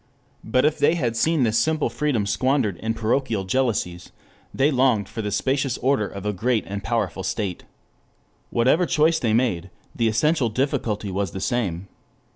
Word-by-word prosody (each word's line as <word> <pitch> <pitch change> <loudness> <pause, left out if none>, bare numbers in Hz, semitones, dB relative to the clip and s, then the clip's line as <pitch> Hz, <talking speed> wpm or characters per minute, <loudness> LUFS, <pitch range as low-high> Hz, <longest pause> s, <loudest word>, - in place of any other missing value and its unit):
But 130 +2 +2
if 150 0 +1
they 160 - +4
had 120 -8 -1
seen 155 +4 +2
this 115 -1 +2
simple 155 -1 +1
freedom 140 -9 -1
squandered 130 -2 +1
in 110 +3 -2
parochial 115 -2 0
jealousies 95 -5 -1 0.4
they 140 +3 +2
longed 125 -7 +2
for 110 +1 -5
the 105 - -3
spacious 135 +5 0
order 130 -5 +1
of 100 0 -8
a 105 - 0
great 110 +4 0
and 100 +1 -5
powerful 115 -5 -1
state. 95 -1 -3 0.8
Whichever 130 +9 +2
choice 160 0 +3
they 115 -3 0
made, 105 -7 0 0.3
the 115 - +1
essential 120 +4 +2
difficulty 110 -5 -1
was 95 -2 -2
the 95 - -4
same. 95 -6 -2
115 Hz, 165 wpm, -23 LUFS, 105-135 Hz, 0.8 s, they